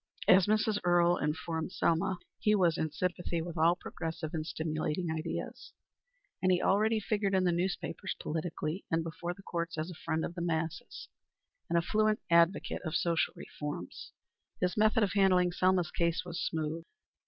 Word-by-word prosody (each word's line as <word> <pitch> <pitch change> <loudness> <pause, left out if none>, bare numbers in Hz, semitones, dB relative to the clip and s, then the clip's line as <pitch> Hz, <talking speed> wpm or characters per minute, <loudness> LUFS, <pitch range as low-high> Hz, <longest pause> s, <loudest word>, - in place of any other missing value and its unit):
As 190 0 +6
Mrs. 215 0 +2
Earle 175 0 +4
informed 160 +2 -2
Selma, 185 +3 +1 0.2
he 210 0 +3
was 175 -5 +3
in 160 - -1
sympathy 175 -1 -2
with 170 +1 -5
all 165 +1 +4
progressive 160 -3 -5
and 160 -2 -1
stimulating 155 +1 -2
ideas, 160 +1 -5 0.7
and 185 - +3
he 180 - +3
already 215 +4 +3
figured 205 -2 0
in 190 - +3
the 180 - +3
newspapers 185 +2 -2
politically, 160 +2 -3
and 165 0 +1
before 170 +2 -5
the 195 - -15
courts 170 -2 -3
as 155 +3 -3
a 170 - -12
friend 160 0 0
of - - -5
the 175 - -5
masses, 160 -1 -3 0.6
and 170 - +2
a 170 - +2
fluent 215 +3 +2
advocate 170 +3 +3
of 160 -2 -3
social 170 -1 +1
reforms. 145 -12 -7 0.5
His 180 0 0
method 215 +1 +4
of 200 - 0
handling 185 -3 +4
Selma's 185 -1 +2
case 170 +1 0
was 175 -1 -4
smooth. 160 0 -2
175 Hz, 165 wpm, -31 LUFS, 160-185 Hz, 0.7 s, As